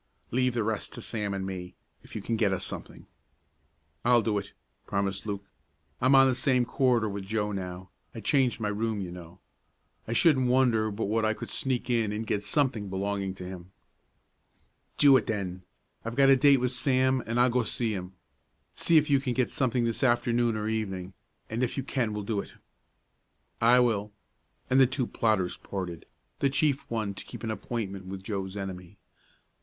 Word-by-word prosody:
"Leave 125 0 +1
the 115 - +1
rest 110 0 -2
to - - -6
Sam 105 -3 -3
and 95 -1 -3
me, 90 -1 -6 0.3
if - - -13
you - - -4
can 115 - -1
get 110 -3 +2
us 95 - -2
something." - - -8 1.0
"I'll 120 -1 +5
do 105 -2 +1
it!" 100 - -9 0.4
promised 100 +1 -2
Luke. 100 -1 -4 0.6
"I'm 130 +2 +5
on 135 0 +7
the 130 - +3
same 125 -1 +2
corridor 125 -2 +2
with 100 -1 -4
Joe 105 +1 -1
now; 90 -1 -6 0.2
I - - -5
changed 125 +2 +2
my 105 -2 -1
room, 110 +1 -1
you 90 -3 -5
know. 90 0 -11 0.7
I 115 - -2
shouldn't 130 -2 +5
wonder 125 -4 +3
but 105 +2 -3
what 110 +2 0
I 110 0 +1
could - - -7
sneak 130 -3 -1
in 115 -4 +1
and 110 +2 -3
get 105 - -1
something 120 -4 0
belonging 95 0 -2
to 90 - -8
him." 90 0 -9 1.2
"Do 140 -2 +7
it, 120 - -2
then. 95 -4 -3 0.4
I've 115 +1 -5
got 135 0 +6
a - - +8
date 140 +1 +6
with 125 -1 +1
Sam, 130 0 +2
and 115 +2 0
I'll 125 0 +5
go 125 +1 +2
see 115 0 -1
him. 90 -1 -6 0.6
See 170 - +4
if 150 -1 +4
you 140 -2 +4
can 130 -2 -2
get 125 0 0
something 125 -2 +1
this 115 -1 -2
afternoon 120 -2 +2
or 105 0 -2
evening, 95 -4 -3 0.3
and 115 +2 -3
if 125 +1 -1
you 135 - -1
can 125 -4 -1
we'll 105 -1 -4
do 105 0 -1
it." - - -7 1.1
"I 120 +2 +6
will," 105 -4 +1 0.6
and 130 - +3
the 130 - +7
two 130 0 -1
plotters 110 -6 0
parted, 90 -4 -6 0.3
the 140 - +2
chief 140 0 0
one 110 -3 -2
to - - -8
keep 120 -2 -10
an 110 - -2
appointment 100 -4 -4
with 95 0 -7
Joe's 95 -1 -4
enemy. 95 -1 -7
110 Hz, 190 wpm, -28 LUFS, 100-125 Hz, 1.2 s, a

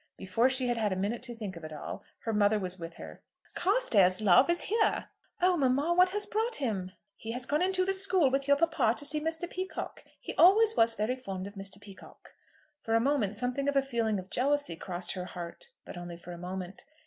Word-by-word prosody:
Before 195 +7 +1
she 260 -1 +3
had 240 -1 0
had 215 -3 0
a - - 0
minute 205 +6 -2
to 240 -1 -5
think 210 -5 -6
of 165 - -10
it 155 - -7
all, 150 - -7 0.2
her 225 - -2
mother 210 0 +3
was 185 -2 -2
with 165 0 -8
her. - - -11 0.3
"Carstairs, 235 - +3
love, 215 - +5
is 345 0 +2
here!" 435 +1 0 0.3
"Oh 365 0 +4
mamma, 280 +2 +2
what 365 +1 +5
has 415 +2 0
brought 445 +3 -1
him?" 195 -9 -2 0.2
"He 225 +2 -6
has 245 +1 +1
gone 300 +4 0
into 370 0 +2
the 385 - +1
school 380 -7 +3
with 275 +1 0
your 280 0 +5
papa 320 -8 +2
to 290 - 0
see 300 +1 -1
Mr. 325 +2 -2
Peacocke. 370 +2 -6 0.2
He - - -6
always 435 +5 +6
was 225 0 +4
very 220 +4 -1
fond 195 -7 -6
of 200 - -8
Mr. 195 0 -7
Peacocke." 200 -2 -15 0.5
For 225 - -1
a - - +5
moment 230 -5 0
something 250 +5 -1
of 285 - -2
a 275 - +4
feeling 230 -5 -1
of 185 0 -8
jealousy 280 - 0
crossed 175 +1 -3
her 180 -1 -5
heart, 175 - -7 0.2
but - - -9
only 175 -1 -7
for 175 +1 -11
a 175 - -7
moment. 185 +3 -7
240 Hz, 225 wpm, -30 LUFS, 190-310 Hz, 0.5 s, always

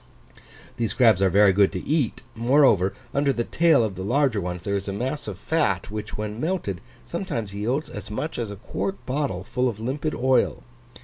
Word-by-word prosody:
These 115 -3 0
crabs 110 -5 +4
are 95 - +4
very 100 +1 +5
good 100 0 +4
to 90 - -4
eat; 145 -6 0
moreover, 120 -5 +3 0.2
under 140 0 +2
the 120 -3 -1
tail 160 -2 +3
of 110 -3 -1
the 95 - -7
larger 120 +1 +1
ones 90 0 -4
there 100 +1 -1
is 100 0 -3
a 100 - -2
mass 130 +7 -3
of 100 -4 -5
fat, 100 - 0
which, 105 0 -5
when 105 +2 -4
melted, 155 - -2 0.2
sometimes 150 - -4
yields 120 +9 -1
as 105 0 -8
much 150 +9 -4
as 115 -3 -2
a 100 - -6
quart 190 - -4
bottle 130 -9 -2
full 125 +6 0
of 110 -3 -6
limpid 140 +7 -2
oil. 130 +1 +2
115 Hz, 195 wpm, -24 LUFS, 100-140 Hz, 0.2 s, very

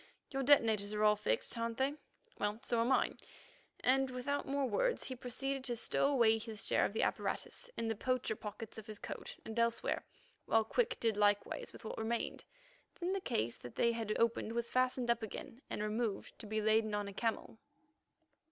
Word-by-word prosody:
Your 270 -1 -1
detonators 220 -7 +4
are 210 - +1
all 210 0 +6
fixed, 210 - 0
aren't 230 0 -2
they? 270 +2 +2 0.5
Well, 205 +1 0
so 235 -3 +1
are 230 - +3
mine," 265 +2 +2 0.6
and 265 +1 +3
without 255 +3 -2
more 275 0 +1
words - - +1
he 260 - -4
proceeded 265 +2 -3
to 240 - -1
stow 240 - +1
away 230 -5 +4
his 220 -2 -4
share - - +3
of - - -2
the 220 - +1
apparatus - - -1
in 230 - -1
the 225 - +1
poacher 255 -1 0
pockets 215 +1 -7
of 215 - -11
his 215 -1 -6
coat - - -6
and 225 +1 -3
elsewhere, 235 0 +1 0.4
while 225 0 +4
Quick 450 - 0
did 225 -3 +1
likewise 205 -1 +2
with - - -12
what - - -4
remained. 225 +1 -2 0.6
Then 360 +1 0
the 390 - -1
case 115 - -1
that 125 - -10
they 235 - +3
had 225 -2 -2
opened 230 -1 +1
was 235 0 -1
fastened 255 -1 +2
up 235 - 0
again 225 +3 -7
and 210 - -2
removed 215 0 -2
to 220 - -7
be 215 +1 0
laden 215 0 +3
on 205 -1 -1
a 200 - -6
camel. 225 +1 -2
230 Hz, 195 wpm, -36 LUFS, 215-255 Hz, 0.6 s, all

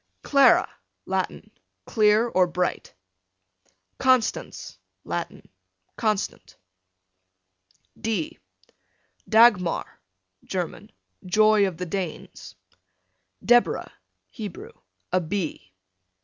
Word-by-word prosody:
Clara, 275 -1 +5 0.4
Latin, - - -3 0.3
clear 215 +1 +3
or 185 -5 +2
bright. 180 +1 -3 1.0
Constance, 255 -3 0 0.2
Latin, - - -5 0.5
constant. 210 - -2 1.4
D 215 -8 -3 0.9
Dagmar, 215 -6 +3 0.4
German, 180 -3 -5 0.3
joy 215 +2 +4
of 180 -4 -6
the 180 - -4
Danes. 180 -2 -6 0.9
Deborah, 240 +1 +3 0.4
Hebrew, 210 -6 -8 0.4
a 185 - +3
bee. 165 - -4
200 Hz, 70 wpm, -24 LUFS, 180-220 Hz, 1.4 s, Clara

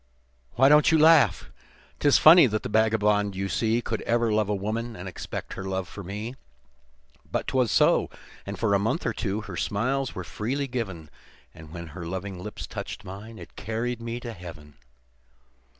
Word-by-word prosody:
"Why 135 +3 +5
don't 150 +3 +6
you 160 - +5
laugh? 160 0 +5 0.5
'Tis 145 -1 +5
funny 165 -2 +8
that 110 -1 -2
the - - -4
vagabond 105 -2 +2
you 95 +1 -2
see 115 +5 0
Could 110 -1 -3
ever 115 -1 +1
love 105 -1 +1
a 105 - +1
woman, 115 +4 -3
and 90 0 -8
expect 90 - -6
her - - -6
love 95 -1 -3
for 100 - -9
me; 105 +6 -5 1.0
But - - -1
'twas 125 -4 +1
so, - - +3 0.3
and 100 0 -6
for 110 -3 +1
a 100 - +4
month 110 - -1
or - - 0
two, 105 0 -2
her 100 -3 -8
smiles 130 +8 -1
were 95 - -4
freely 130 +10 -3
given, 95 - -5 0.4
And 80 -1 -13
when 85 -1 -8
her 85 +1 -7
loving 95 +1 -5
lips - - -7
touched - - -7
mine, 105 +4 -9
it - - -12
carried 115 +2 -3
me 115 +1 -4
to 120 -1 -6
Heaven. 80 -6 -11
110 Hz, 180 wpm, -26 LUFS, 95-120 Hz, 1.0 s, funny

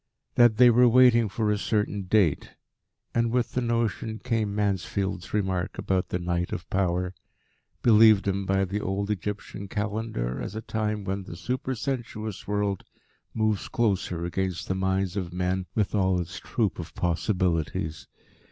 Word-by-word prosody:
that 120 -3 +5
they 125 -1 +8
were 125 +2 +6
waiting 120 -2 +5
for 105 +2 0
a 105 - 0
certain 105 -2 -1
date, 90 -6 +1 0.6
and, 115 0 +2
with 125 0 0
the 125 - -1
notion, 115 -2 -1
came 110 -4 -1
Mansfield's 100 -2 -1
remark 95 -3 -1
about 95 -1 0
"the - - -1
Night 90 0 -2
of 85 - -5
Power," 90 -1 0 0.7
believed 110 -3 +6
in 100 0 0
by 95 0 +1
the 100 +3 -3
old 100 +2 -2
Egyptian 100 0 -4
Calendar 105 - -3
as 100 - -5
a 110 - -3
time 105 -2 -2
when 95 0 -3
the 85 - -8
supersensuous 120 -2 -4
world 100 -1 -1 0.5
moves 110 -2 0
close 105 -7 0
against 90 +1 -2
the - - 0
minds 95 0 0
of 90 -4 -3
men 90 +1 -1
with 105 -3 0
all 95 -3 +2
its 90 +1 -5
troop 110 -7 -1
of 85 - -7
possibilities. 85 -3 -1
100 Hz, 150 wpm, -26 LUFS, 90-110 Hz, 0.7 s, they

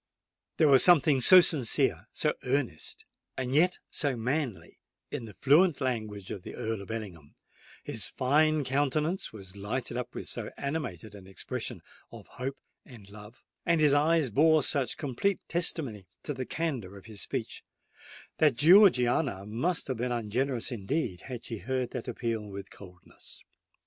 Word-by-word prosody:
There 155 - +5
was 135 -2 +6
something 150 -6 +5
so 185 +7 +9
sincere—so 140 -9 +1
earnest—and 130 - -4
yet 175 +5 +3
so 145 -4 -1
manly 125 0 -3 0.3
in 115 - -4
the 105 - -12
fluent 155 +4 +4
language 110 -7 -3
of 100 - -5
the - - -9
Earl 110 -2 -3
of 100 - -11
Ellingham,—his 95 -10 -8
fine 155 +3 +2
countenance 145 +6 -1
was 95 -3 -11
lighted 120 +5 -4
up 125 - -5
with - - -5
so - - -4
animated 125 - -4
an 95 -2 -12
expression 95 -4 -5 0.3
of - - -11
hope 135 +2 -6 0.3
and 105 -6 -14
love,—and 110 - -4
his 150 -2 +4
eyes 150 -2 +3
bore 155 +5 +4
such 140 -3 -1
complete 155 +8 -1
testimony 140 - -1 0.2
to 145 - -3
the 130 -2 -5
candour 130 - -3
of 95 - -14
his 110 -3 -7
speech,—that 150 -5 -4
Georgiana 135 - +5
must 135 - -1
have 130 -3 -3
been 125 +2 -2
ungenerous 120 +2 -2
indeed 115 - -2
had 125 -2 -6
she 115 -3 -5
heard 130 +4 -2
that - - -6
appeal 115 -3 -2
with 100 -1 -9
coldness. 90 -2 -13
125 Hz, 145 wpm, -29 LUFS, 105-150 Hz, 0.3 s, so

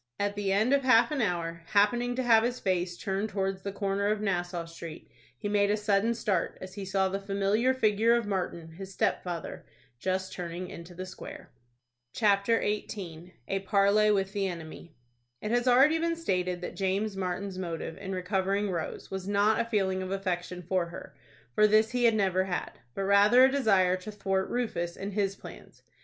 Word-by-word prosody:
At 205 0 0
the 205 -1 -1
end 215 +7 +3
of 280 - +4
half 255 +1 +5
an 290 -3 0
hour, 170 -4 -2
happening 240 +4 +3
to 260 - -1
have 230 -2 +6
his 245 +1 -1
face 180 -2 -1
turned 195 +3 -2
towards 195 -1 -2
the 200 - -4
corner 200 0 -1
of 210 0 +1
Nassau 175 -4 -2
Street, 165 -1 -10 0.3
he 210 - -4
made 205 0 +2
a 210 - +2
sudden 210 +2 +1
start 200 -6 -1
as 185 0 -9
he 200 -2 -6
saw 190 0 +1
the 195 +1 -2
familiar 200 +5 +1
figure 225 -2 +3
of 235 -2 0
Martin, 180 -4 -3
his 190 +4 -9
stepfather, 175 -2 -2 0.4
just 190 +3 -2
turning 175 +1 -5
into 170 +1 -10
the 185 +1 -5
Square. 185 - -10 0.6
CHAPTER 210 +1 +3
XVIII. 180 -5 -4
A 195 - -1
PARLEY 200 +2 +3
WITH 195 -2 +1
THE 200 -2 0
ENEMY. 170 -1 -8 0.4
It 210 - -4
has 245 +1 +1
already 270 +6 +5
been 335 0 0
stated 180 - -1
that 180 - -6
James 195 +2 -1
Martin's 190 0 -3
motive 165 -2 -4
in 195 -1 -6
recovering 195 +2 0
Rose 170 -3 -5
was 190 0 -5
not 205 +2 +3
a - - -2
feeling 190 -4 0
of 185 - -4
affection 180 -2 -3
for 180 0 0
her, 170 -4 -10 0.4
for 215 - +5
this 215 +1 +4
he 245 -1 +1
had 230 -1 +5
never 190 -3 +2
had, 180 -2 -3 0.2
but 195 - -2
rather 205 +5 +6
a 265 - +3
desire 195 -9 +3
to 185 +4 -8
thwart 195 -2 -1
Rufus 175 -8 -2
in 200 +1 -5
his 195 -1 0
plans. - - -13
195 Hz, 190 wpm, -29 LUFS, 185-215 Hz, 0.6 s, have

